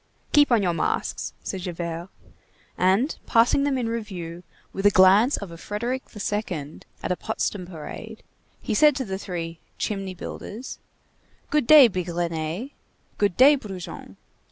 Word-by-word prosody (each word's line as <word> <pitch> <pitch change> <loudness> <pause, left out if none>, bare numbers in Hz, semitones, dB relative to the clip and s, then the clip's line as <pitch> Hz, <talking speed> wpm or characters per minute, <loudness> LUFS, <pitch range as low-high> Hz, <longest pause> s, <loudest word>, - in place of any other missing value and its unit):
"Keep 290 -3 +5
on 225 -4 +4
your 175 -2 +1
masks," - - -2
said 190 - -4
Javert. 170 -1 -5 0.7
And 195 - +2
passing 235 +4 +4
them 280 -2 +1
in 245 -3 -1
review 185 -7 -5 0.3
with 195 +1 +2
a - - +8
glance 200 +7 +5
of 195 -4 -7
a 165 - -10
Frederick 240 +8 -3
II. 190 -8 -3 0.2
at - - -2
a - - +2
Potsdam 200 -2 -3
parade, 190 +6 -9 0.4
he 225 - -2
said 295 +6 +5
to 265 -2 -2
the 190 -2 -4
three 165 -3 -5 0.2
"chimney 195 -3 -3
builders":— 220 +7 -7 0.7
"Good 300 -5 +2
day, 300 -4 +10
Bigrenaille! 175 - -3 0.5
good 200 -4 +1
day, 280 +4 +8
Brujon! 195 -9 -8
200 Hz, 145 wpm, -24 LUFS, 175-235 Hz, 0.7 s, day